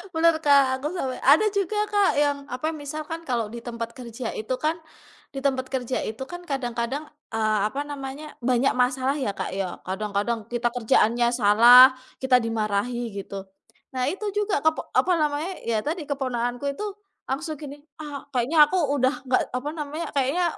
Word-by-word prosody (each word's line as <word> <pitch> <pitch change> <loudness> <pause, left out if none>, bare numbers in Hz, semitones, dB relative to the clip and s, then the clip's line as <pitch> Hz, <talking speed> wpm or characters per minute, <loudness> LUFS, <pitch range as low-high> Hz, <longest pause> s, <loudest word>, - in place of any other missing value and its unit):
Bener 330 0 +4
Kak, 275 -2 +5
aku 285 - -3
sampai 260 -7 -3
ada 295 +11 +5
juga 400 0 -1
Kak 410 -2 +4
yang 285 -1 +2
apa, 255 +5 -3
misalkan 310 +2 -6
kalau 235 -4 -1
di 235 - -6
tempat 235 -1 -6
kerja 235 -1 -6
itu 220 +4 -4
kan 310 +5 0 0.6
di 275 - -4
tempat 260 -2 0
kerja 255 -1 -1
itu 220 +5 -5
kan 350 0 -6
kadang-kadang, 255 +1 -2 0.3
eee, 215 -1 +2
apa 270 +6 -4
namanya, 285 0 -7
banyak 250 +2 +2
masalah 260 +2 +1
ya, 255 -7 -1
Kak, - - -4
ya. 190 -1 -3
Kadang-kadang 210 +3 -2
kita 240 0 0
kerjaannya 235 0 +3
salah, 240 +4 +8 0.3
kita 260 -1 +5
dimarahi 230 +1 -1
gitu. 195 0 -7 0.5
Nah, 255 - 0
itu 390 - -7
juga 410 -8 0
kepok 315 0 +1
apa 370 - +3
namanya, 300 +4 0 0.2
ya 225 -2 +1
tadi 320 +2 -3
keponakanku 245 -2 -2
itu 280 +10 -5 0.4
langsung 310 +4 -3
gini, 285 -2 -7 0.2
"Ah, 295 -2 -7
kayaknya 255 +5 0
aku 375 - +1 0.2
udah 260 +1 +2
nggak 250 - +3
apa 255 +4 -3
namanya, 305 +1 -4
kayaknya, 280 +6 +1
260 Hz, 165 wpm, -25 LUFS, 235-295 Hz, 0.6 s, salah